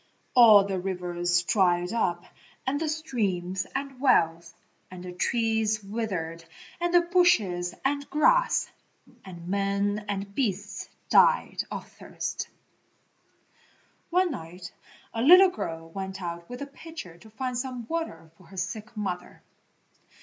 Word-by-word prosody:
All 220 Hz, -5 st, +9 dB
the 195 Hz, -2 st, -2 dB
rivers 175 Hz, -1 st, -1 dB
dried 180 Hz, 0 st, +2 dB
up 175 Hz, -7 st, 0 dB, 0.4 s
and 275 Hz, +2 st, 0 dB
the 320 Hz, -, 0 dB
streams 200 Hz, -, -2 dB
and 275 Hz, -1 st, -4 dB
wells, 170 Hz, -, +2 dB, 0.3 s
and 185 Hz, -1 st, -9 dB
the 180 Hz, -, -6 dB
trees 220 Hz, +1 st, 0 dB
withered 195 Hz, -6 st, -4 dB, 0.4 s
and 345 Hz, 0 st, 0 dB
the 350 Hz, 0 st, +6 dB
bushes 225 Hz, -, +2 dB
and 285 Hz, +1 st, 0 dB
grass, -, -, +3 dB, 0.6 s
and 175 Hz, -2 st, -10 dB
men 200 Hz, +2 st, 0 dB
and 200 Hz, 0 st, -3 dB
beasts 205 Hz, -4 st, -2 dB, 0.2 s
died -, -, +4 dB
of -, -, -6 dB
thirst. -, -, -5 dB, 1.6 s
One 360 Hz, 0 st, +2 dB
night 175 Hz, -, -8 dB, 0.4 s
a 225 Hz, -, -2 dB
little 365 Hz, +8 st, +8 dB
girl 165 Hz, -, -6 dB
went 190 Hz, +1 st, -5 dB
out 170 Hz, -1 st, -6 dB
with 245 Hz, +3 st, -6 dB
a -, -, -4 dB
pitcher 280 Hz, -, -10 dB
to 220 Hz, -, -15 dB
find 250 Hz, +3 st, -4 dB
some 250 Hz, -1 st, -4 dB
water 280 Hz, -, -4 dB
for 185 Hz, -, -18 dB
her 195 Hz, -, -13 dB
sick 215 Hz, +5 st, -5 dB
mother. 180 Hz, -4 st, -5 dB
200 Hz, 130 wpm, -27 LUFS, 180-265 Hz, 1.6 s, All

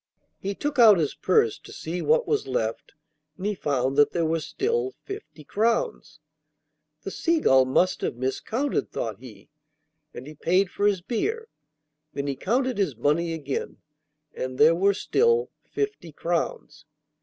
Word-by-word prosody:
He 200 Hz, +1 st, -3 dB
took 290 Hz, +2 st, -3 dB
out 220 Hz, -4 st, +8 dB
his 155 Hz, -4 st, 0 dB
purse 440 Hz, -1 st, +2 dB
to -, -, -14 dB
see 170 Hz, +3 st, -5 dB
what 480 Hz, +1 st, +2 dB
was 430 Hz, -1 st, 0 dB
left, 110 Hz, 0 st, -2 dB, 0.4 s
and 190 Hz, -, -6 dB
he 210 Hz, -, +1 dB
found 140 Hz, -6 st, -1 dB
that 145 Hz, -, +5 dB
there 170 Hz, -2 st, +1 dB
were 165 Hz, +1 st, +1 dB
still 410 Hz, -, -2 dB
fifty 395 Hz, -, -9 dB
crowns. 235 Hz, -, -1 dB, 0.8 s
'The -, -, -5 dB
Seagull 305 Hz, -, +3 dB
must 175 Hz, +8 st, +1 dB
have -, -, -2 dB
miscounted,' 220 Hz, -, -2 dB
thought 110 Hz, -3 st, -4 dB
he, 115 Hz, -2 st, -14 dB, 0.6 s
and 125 Hz, -, -9 dB
he 150 Hz, -, -9 dB
paid 180 Hz, +5 st, +1 dB
for 205 Hz, -, +1 dB
his 195 Hz, -3 st, +1 dB
beer. 435 Hz, -, -2 dB, 0.6 s
Then 140 Hz, -, -3 dB
he 140 Hz, -1 st, -2 dB
counted 245 Hz, -, 0 dB
his 175 Hz, -10 st, 0 dB
money 165 Hz, +7 st, +1 dB
again, 145 Hz, -4 st, -4 dB, 0.6 s
and 130 Hz, 0 st, -5 dB
there 155 Hz, +4 st, +6 dB
were 195 Hz, +3 st, +2 dB
still 465 Hz, -, +2 dB, 0.2 s
fifty 415 Hz, -, -3 dB
crowns. 150 Hz, -2 st, -3 dB
185 Hz, 155 wpm, -25 LUFS, -, 0.8 s, out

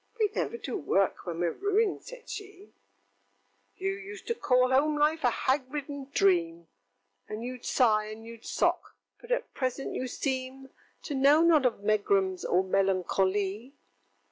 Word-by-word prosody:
ŌĆØŌĆö 425 Hz, -2 st, +3 dB
ŌĆ£We -, -, -22 dB
never 470 Hz, -, -2 dB
do 440 Hz, -, -4 dB
work 195 Hz, -, 0 dB
when 170 Hz, -, -3 dB
weŌĆÖre 170 Hz, -1 st, -2 dB
ruined, 405 Hz, +1 st, +2 dB
ŌĆØ -, -, -28 dB
said -, -, -11 dB
she. 405 Hz, -1 st, -9 dB, 1.1 s
ŌĆöŌĆ£You 390 Hz, +1 st, -2 dB
used 400 Hz, +1 st, -9 dB
to 465 Hz, -, 0 dB
call 255 Hz, -, +2 dB
home 295 Hz, +3 st, +3 dB
life 305 Hz, +1 st, +2 dB
a 245 Hz, -, +5 dB
hag 260 Hz, +2 st, 0 dB
ridden 285 Hz, -2 st, -5 dB
dream, 170 Hz, -, +2 dB, 0.6 s
And 215 Hz, +2 st, -5 dB
youŌĆÖd 250 Hz, 0 st, -7 dB
sigh, 215 Hz, -4 st, +3 dB
and 215 Hz, +1 st, -9 dB
youŌĆÖd 230 Hz, 0 st, -11 dB
sock; -, -, 0 dB, 0.2 s
but 475 Hz, -, -12 dB
at -, -, -1 dB
present 260 Hz, +1 st, -2 dB
you 255 Hz, -, -3 dB
seem 260 Hz, 0 st, -4 dB, 0.3 s
To 295 Hz, -, -4 dB
know 285 Hz, +4 st, +5 dB
not 315 Hz, -6 st, +5 dB
of 220 Hz, -4 st, -4 dB
megrims 200 Hz, -3 st, +1 dB
or 185 Hz, +2 st, +2 dB
melancho 190 Hz, 0 st, +1 dB
ly! 205 Hz, +6 st, -3 dB
260 Hz, 170 wpm, -29 LUFS, 205-315 Hz, 1.1 s, a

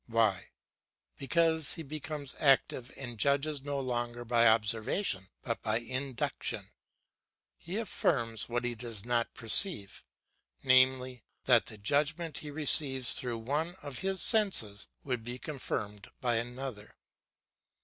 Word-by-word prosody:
Why? 110 Hz, -5 st, 0 dB, 0.7 s
Because 160 Hz, +2 st, +2 dB
he 165 Hz, -, -7 dB
becomes 150 Hz, -1 st, -5 dB
active 135 Hz, -3 st, +2 dB
and 120 Hz, -4 st, -8 dB
judges 140 Hz, +4 st, +1 dB
no 140 Hz, 0 st, -3 dB
longer 120 Hz, -2 st, -3 dB
by 120 Hz, 0 st, +3 dB
observation 110 Hz, -, +1 dB, 0.2 s
but 115 Hz, -2 st, -3 dB
by 110 Hz, 0 st, 0 dB
induction, 130 Hz, +1 st, -3 dB, 0.8 s
he 180 Hz, +5 st, -6 dB
affirms 120 Hz, -, -1 dB
what 120 Hz, 0 st, -2 dB
he 120 Hz, 0 st, -1 dB
does 115 Hz, -3 st, -6 dB
not 120 Hz, -1 st, -1 dB
perceive, 115 Hz, -, +2 dB, 0.6 s
i.e., 130 Hz, -1 st, +3 dB, 0.2 s
that 120 Hz, -3 st, +4 dB
the 110 Hz, -, -9 dB
judgment 150 Hz, +8 st, -1 dB
he 150 Hz, -, -8 dB
receives 140 Hz, -3 st, +4 dB
through 120 Hz, -2 st, -1 dB
one 150 Hz, +9 st, -3 dB
of 145 Hz, -3 st, -6 dB
his 190 Hz, 0 st, +1 dB
senses 185 Hz, -, +4 dB, 0.2 s
would 125 Hz, -4 st, -3 dB
be 120 Hz, +2 st, -5 dB
confirmed 105 Hz, -, -5 dB
by 120 Hz, -3 st, 0 dB
another. 120 Hz, -2 st, -6 dB
125 Hz, 125 wpm, -30 LUFS, 115-145 Hz, 0.8 s, that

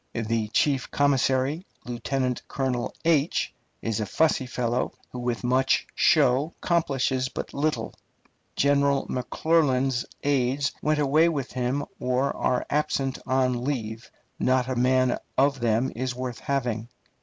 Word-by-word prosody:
The 115 Hz, -1 st, -1 dB
chief 135 Hz, +4 st, +1 dB
commissary, 140 Hz, +2 st, +1 dB, 0.2 s
Lieutenant 125 Hz, +1 st, -2 dB
Colonel, 130 Hz, -3 st, -2 dB
is 145 Hz, -, -1 dB
a 105 Hz, -, -2 dB
fussy 155 Hz, 0 st, +2 dB
fellow, 125 Hz, 0 st, -1 dB, 0.2 s
who 125 Hz, -, -6 dB
with 120 Hz, -1 st, -2 dB
much 130 Hz, +2 st, +2 dB
show 135 Hz, +6 st, +3 dB
accomplishes 135 Hz, -6 st, +1 dB
but -, -, -6 dB
little. 150 Hz, +2 st, -1 dB, 0.6 s
General 140 Hz, 0 st, +2 dB
McClernand's 135 Hz, -1 st, +1 dB, 0.2 s
aides 140 Hz, +1 st, +1 dB
went 155 Hz, 0 st, +1 dB
away 150 Hz, +3 st, +4 dB
with 140 Hz, -5 st, -3 dB
him 130 Hz, +3 st, -1 dB
or 130 Hz, +2 st, 0 dB
are 125 Hz, -1 st, 0 dB
absent 140 Hz, -2 st, 0 dB
on 130 Hz, -2 st, +1 dB
leave. 115 Hz, -5 st, -3 dB, 0.3 s
Not 130 Hz, 0 st, +2 dB
a 130 Hz, -, -2 dB
man 130 Hz, 0 st, +2 dB, 0.2 s
of 140 Hz, +1 st, +3 dB
them 120 Hz, +2 st, +1 dB
is 125 Hz, +1 st, -2 dB
worth 125 Hz, -2 st, -4 dB
having. 120 Hz, -5 st, -2 dB
130 Hz, 125 wpm, -26 LUFS, 125-140 Hz, 0.6 s, away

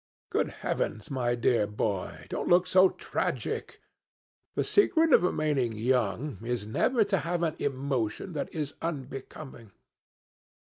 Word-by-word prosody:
Good -, -, +1 dB, 0.2 s
heavens, 110 Hz, +3 st, -2 dB
my 120 Hz, -2 st, 0 dB
dear 120 Hz, -3 st, +2 dB
boy, 105 Hz, -2 st, -3 dB
don't -, -, -3 dB
look 175 Hz, +1 st, +5 dB
so 185 Hz, +1 st, +6 dB
tragic! -, -, -3 dB, 0.8 s
The -, -, +1 dB
secret 330 Hz, -7 st, +4 dB
of -, -, +7 dB
remaining 150 Hz, -9 st, +1 dB
young 120 Hz, +1 st, 0 dB
is 120 Hz, -3 st, -2 dB
never 225 Hz, -, +2 dB
to 200 Hz, -2 st, 0 dB
have 175 Hz, 0 st, -1 dB
an 160 Hz, -2 st, 0 dB
emotion 135 Hz, -, -2 dB
that 150 Hz, -, -3 dB
is 150 Hz, -3 st, -3 dB
unbecoming. 135 Hz, -6 st, -6 dB
135 Hz, 130 wpm, -29 LUFS, 115-170 Hz, 0.8 s, of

